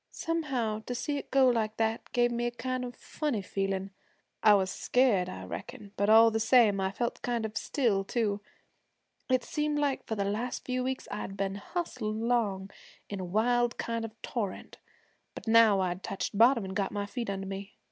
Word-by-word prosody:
Somehow, 270 Hz, -10 st, -2 dB
to 245 Hz, -, -3 dB
see 285 Hz, +3 st, -2 dB
it -, -, -10 dB
go 270 Hz, -1 st, +5 dB
like 220 Hz, -3 st, +1 dB
that 225 Hz, 0 st, -1 dB
gave 240 Hz, 0 st, +2 dB
me 240 Hz, 0 st, -1 dB
a -, -, -2 dB
kind 255 Hz, +1 st, -3 dB
of 245 Hz, -1 st, -6 dB
funny 280 Hz, -10 st, -3 dB
feelin'. 195 Hz, 0 st, -2 dB, 0.5 s
I 210 Hz, -1 st, +7 dB
was 190 Hz, -2 st, +1 dB
scared, 210 Hz, -6 st, +2 dB
I -, -, -7 dB
reckon, 205 Hz, -2 st, -8 dB
but 200 Hz, +1 st, +1 dB
all 225 Hz, +1 st, +8 dB
the 220 Hz, -, 0 dB
same 225 Hz, -3 st, +4 dB
I 190 Hz, -, +1 dB
felt 235 Hz, +5 st, -3 dB
kind 235 Hz, -2 st, -1 dB
of 215 Hz, -1 st, -6 dB
still 220 Hz, -8 st, +1 dB
too. 205 Hz, -1 st, -1 dB, 0.9 s
It 255 Hz, -1 st, +3 dB
seemed 300 Hz, -1 st, -1 dB
like 285 Hz, -2 st, -1 dB
for 220 Hz, -, -2 dB
the 200 Hz, -2 st, -1 dB
last 220 Hz, +5 st, -3 dB
few 255 Hz, 0 st, -1 dB
weeks 260 Hz, +1 st, -3 dB
I'd 195 Hz, -1 st, -5 dB
been 195 Hz, 0 st, -1 dB
hustled 215 Hz, -, -4 dB
along 215 Hz, -4 st, 0 dB, 0.4 s
in 200 Hz, -, -3 dB
a -, -, -3 dB
wild 235 Hz, +6 st, +1 dB
kind 230 Hz, 0 st, -2 dB
of 225 Hz, -, -4 dB
a -, -, -38 dB
torrent, 210 Hz, -6 st, -4 dB, 0.6 s
but -, -, -9 dB
now 225 Hz, -3 st, +6 dB
I'd 180 Hz, 0 st, -2 dB
touched 195 Hz, +1 st, -4 dB
bottom 230 Hz, 0 st, +5 dB
an' 190 Hz, -, -5 dB
got 195 Hz, -1 st, -1 dB
my 205 Hz, -1 st, -2 dB
feet 230 Hz, +2 st, -4 dB
under 195 Hz, 0 st, -3 dB
me. 195 Hz, +1 st, -7 dB
225 Hz, 200 wpm, -30 LUFS, 200-245 Hz, 0.9 s, all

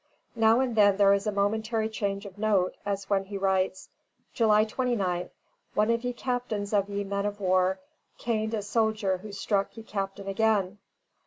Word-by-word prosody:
Now 225 Hz, +2 st, +4 dB
and 250 Hz, -3 st, -1 dB
then 205 Hz, -2 st, +5 dB
there 200 Hz, -1 st, +6 dB
is 200 Hz, +2 st, 0 dB
a -, -, +1 dB
momentary 220 Hz, +2 st, 0 dB
change 200 Hz, -2 st, -3 dB
of 200 Hz, 0 st, -11 dB
note, 205 Hz, -4 st, +1 dB
as 200 Hz, -1 st, -2 dB
when 195 Hz, -1 st, +1 dB
he 200 Hz, +1 st, -5 dB
writes: 190 Hz, -1 st, 0 dB, 0.5 s
"July 215 Hz, -2 st, +4 dB
29th. 215 Hz, -7 st, -1 dB, 0.5 s
One 215 Hz, +2 st, +3 dB
of 230 Hz, +1 st, 0 dB
ye 245 Hz, -, -1 dB
Captains 240 Hz, -5 st, -3 dB
of 200 Hz, -1 st, +2 dB
ye 200 Hz, 0 st, -2 dB
men 200 Hz, +1 st, -2 dB
of 205 Hz, 0 st, -5 dB
war 185 Hz, -1 st, +2 dB, 0.4 s
caind 220 Hz, -1 st, -1 dB
a 210 Hz, -, -3 dB
soldier 215 Hz, -3 st, 0 dB
who 210 Hz, +3 st, -9 dB
struck 200 Hz, +1 st, -1 dB
ye 225 Hz, -, -8 dB
capt. 195 Hz, -3 st, -4 dB
again. 200 Hz, 0 st, 0 dB
205 Hz, 175 wpm, -28 LUFS, 195-220 Hz, 0.5 s, there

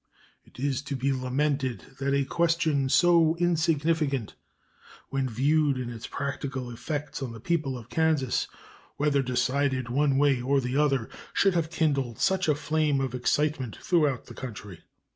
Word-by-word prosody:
It -, -, -20 dB
is 135 Hz, 0 st, -1 dB
to 140 Hz, -, -1 dB
be 135 Hz, +1 st, 0 dB
lamented 130 Hz, -2 st, -1 dB, 0.2 s
that 140 Hz, 0 st, +1 dB
a 140 Hz, -1 st, +1 dB
question 160 Hz, -3 st, +1 dB
so 170 Hz, 0 st, +5 dB
insignificant 160 Hz, -6 st, +1 dB, 0.8 s
when 135 Hz, -1 st, -1 dB
viewed 140 Hz, +4 st, +2 dB
in 125 Hz, -1 st, -4 dB
its 115 Hz, -1 st, -7 dB
practical 135 Hz, -3 st, -4 dB
effects 145 Hz, +4 st, -5 dB
on 125 Hz, -4 st, -4 dB
the 115 Hz, -, -9 dB
people 145 Hz, -1 st, -1 dB
of 115 Hz, -2 st, -11 dB
Kansas, 155 Hz, -6 st, +1 dB, 0.5 s
whether 145 Hz, -1 st, +2 dB
decided 130 Hz, 0 st, 0 dB
one 140 Hz, +2 st, +2 dB
way 140 Hz, -3 st, +3 dB
or 135 Hz, +3 st, +2 dB
the 125 Hz, 0 st, -3 dB
other, 140 Hz, -5 st, +2 dB, 0.3 s
should 195 Hz, -1 st, +3 dB
have 165 Hz, -2 st, 0 dB
kindled 140 Hz, -8 st, 0 dB
such 190 Hz, -2 st, +1 dB
a 150 Hz, -, +3 dB
flame 150 Hz, -1 st, 0 dB
of 135 Hz, -2 st, -2 dB
excitement 130 Hz, 0 st, 0 dB
throughout 150 Hz, -8 st, +1 dB
the -, -, -11 dB
country. 105 Hz, -8 st, -8 dB
140 Hz, 155 wpm, -27 LUFS, 130-155 Hz, 0.8 s, so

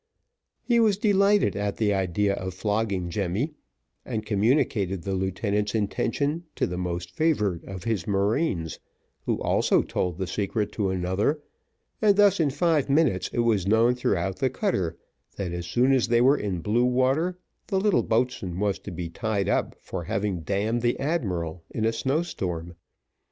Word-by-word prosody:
He 235 Hz, -1 st, +3 dB
was 215 Hz, -4 st, +4 dB
delighted 200 Hz, -, +3 dB
at 100 Hz, 0 st, -2 dB
the 105 Hz, -2 st, +2 dB
idea 95 Hz, +1 st, +1 dB
of 95 Hz, -2 st, -5 dB
flogging 100 Hz, -3 st, -1 dB
Jemmy, 100 Hz, -, -1 dB, 0.5 s
and 110 Hz, -4 st, -4 dB
communicated 105 Hz, -, +1 dB
the 100 Hz, -, -2 dB
lieutenant's 100 Hz, +3 st, -1 dB
intention 140 Hz, -, -1 dB
to -, -, +1 dB
the 90 Hz, -, -4 dB
most 90 Hz, -1 st, -3 dB
favoured 105 Hz, -, 0 dB
of 95 Hz, -2 st, -7 dB
his 110 Hz, -7 st, -2 dB
marines, 100 Hz, -, 0 dB, 0.5 s
who -, -, 0 dB
also -, -, +3 dB
told 90 Hz, -2 st, -2 dB
the 95 Hz, -, -2 dB
secret 105 Hz, +2 st, -2 dB
to 100 Hz, -3 st, -1 dB
another, 95 Hz, -, 0 dB, 0.6 s
and 210 Hz, -2 st, +5 dB
thus 205 Hz, -2 st, +5 dB
in 155 Hz, -3 st, +3 dB
five 150 Hz, 0 st, +1 dB
minutes, 140 Hz, -, +2 dB
it 120 Hz, -, 0 dB
was 105 Hz, -5 st, +1 dB
known 115 Hz, +4 st, +4 dB
throughout 95 Hz, -6 st, -1 dB
the 130 Hz, -, +1 dB
cutter, 95 Hz, -, -1 dB, 0.4 s
that 95 Hz, -4 st, -3 dB
as 85 Hz, 0 st, -4 dB
soon 125 Hz, +9 st, +3 dB
as 130 Hz, -3 st, +2 dB
they 120 Hz, 0 st, +3 dB
were 130 Hz, +4 st, +5 dB
in 100 Hz, -, -3 dB
blue 110 Hz, +7 st, +2 dB
water, 135 Hz, +8 st, +1 dB, 0.3 s
the 190 Hz, -, +1 dB
little 205 Hz, 0 st, +3 dB
boatswain 110 Hz, -6 st, -1 dB
was 100 Hz, -2 st, 0 dB
to 100 Hz, -, -9 dB
be 85 Hz, -1 st, -5 dB
tied 100 Hz, +3 st, -2 dB
up -, -, 0 dB
for 90 Hz, -3 st, -6 dB
having 100 Hz, 0 st, -1 dB
damned 105 Hz, +7 st, -1 dB
the 120 Hz, 0 st, +1 dB
admiral 90 Hz, -, -2 dB
in 110 Hz, -, -2 dB
a 115 Hz, -, +2 dB
snow 135 Hz, +8 st, 0 dB
storm. 85 Hz, -, -4 dB
105 Hz, 165 wpm, -26 LUFS, 95-130 Hz, 0.6 s, and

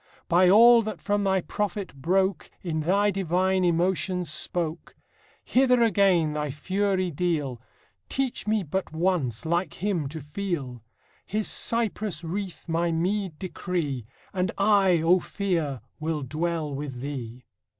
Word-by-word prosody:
By 180 Hz, +1 st, +5 dB
all 230 Hz, +4 st, +8 dB
that 215 Hz, -4 st, -5 dB
from 205 Hz, 0 st, 0 dB
thy 190 Hz, -1 st, +2 dB
prophet 200 Hz, -4 st, -3 dB
broke 190 Hz, +7 st, 0 dB
In 165 Hz, -3 st, -2 dB
thy 200 Hz, +6 st, +2 dB
divine 185 Hz, 0 st, +1 dB
emotions 180 Hz, 0 st, +1 dB
spoke: 165 Hz, 0 st, -3 dB, 0.5 s
Hither 250 Hz, -2 st, +4 dB
again 185 Hz, -7 st, +3 dB
thy 150 Hz, 0 st, -2 dB
fury 185 Hz, +5 st, -1 dB
deal, 145 Hz, -7 st, -1 dB, 0.5 s
Teach 265 Hz, -5 st, -2 dB
me 215 Hz, -1 st, +1 dB
but 185 Hz, +3 st, -3 dB
once, 160 Hz, -, 0 dB
like 170 Hz, 0 st, 0 dB
him, 175 Hz, -7 st, -1 dB
to 160 Hz, +2 st, -6 dB
feel; 150 Hz, -, -4 dB, 0.5 s
His 215 Hz, +1 st, -1 dB
cypress 215 Hz, -7 st, 0 dB
wreath 185 Hz, +2 st, -5 dB
my 170 Hz, +1 st, 0 dB
meed 180 Hz, +1 st, -1 dB
decree, 155 Hz, -, -3 dB, 0.3 s
And 185 Hz, -2 st, 0 dB
I, 195 Hz, -5 st, +4 dB
O 180 Hz, +3 st, +5 dB
Fear, 170 Hz, -, -2 dB, 0.2 s
will 155 Hz, -2 st, -2 dB
dwell 155 Hz, +2 st, -2 dB
with 135 Hz, -3 st, -5 dB
thee! 125 Hz, -3 st, -6 dB
180 Hz, 130 wpm, -26 LUFS, 155-195 Hz, 0.5 s, all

